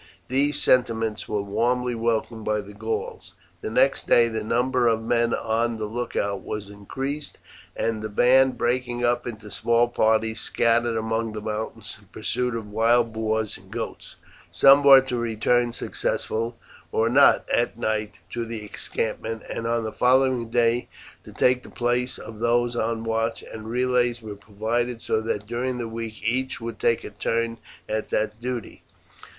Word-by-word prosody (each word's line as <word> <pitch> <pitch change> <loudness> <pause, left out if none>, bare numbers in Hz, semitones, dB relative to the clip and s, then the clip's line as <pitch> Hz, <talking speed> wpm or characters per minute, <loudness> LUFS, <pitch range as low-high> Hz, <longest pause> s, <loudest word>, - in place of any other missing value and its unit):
These 140 +3 +1
sentiments 115 -3 +1
were 105 -2 -1
warmly 125 +4 0
welcomed 115 -1 -1
by 105 0 0
the 100 0 -12
Gauls. 110 +2 -5 0.3
The - - -3
next - - +2
day 115 -1 +5
the 110 -1 -3
number 125 +2 +1
of 115 -1 +1
men 115 0 +1
on 115 +1 0
the 110 - -3
lookout 105 -3 -2
was 105 -1 -6
increased, 135 +9 -5 0.4
and 115 -1 -1
the 110 - -4
band, 130 +4 +4
breaking 120 0 0
up 120 0 +1
into 110 -3 -8
small 120 +1 +2
parties, 110 -1 +1
scattered 115 0 +1
among 110 0 -1
the 110 - -4
mountains 110 +1 -4
in - - -22
pursuit 125 -1 -2
of 105 -2 -6
wild 115 +1 +3
boars 110 -1 -1
and - - -19
goats. - - -6 0.4
Some 140 +1 +6
were 135 -1 +9
to 130 -2 -3
return, 120 +1 +1
successful 115 0 -2 0.4
or 110 - +2
not, 135 +4 +5
at 120 -1 +1
night 110 -2 -2 0.2
to 120 - -2
the 115 -2 -6
encampment, 110 +1 -3
and 115 - -4
on 115 0 0
the 110 - -3
following 130 -2 +3
day 120 +1 +2 0.4
to - - -11
take 125 0 +2
the - - -13
place 125 +1 -1
of 110 -1 -10
those 120 +1 +1
on 115 -1 -1
watch, 115 0 -1
and 110 0 -9
relays 125 0 +1
were 110 -2 -7
provided 110 +4 -2
so 110 - 0
that 105 -2 -3
during 125 +3 -2
the 120 -1 -3
week 115 -1 -6
each 130 +3 -1
would 115 -1 -6
take 115 - +2
a - - -7
turn 115 +2 -1 0.3
at 110 0 -2
that 110 +1 -1
duty. 125 -3 -5
115 Hz, 165 wpm, -24 LUFS, 110-120 Hz, 0.4 s, were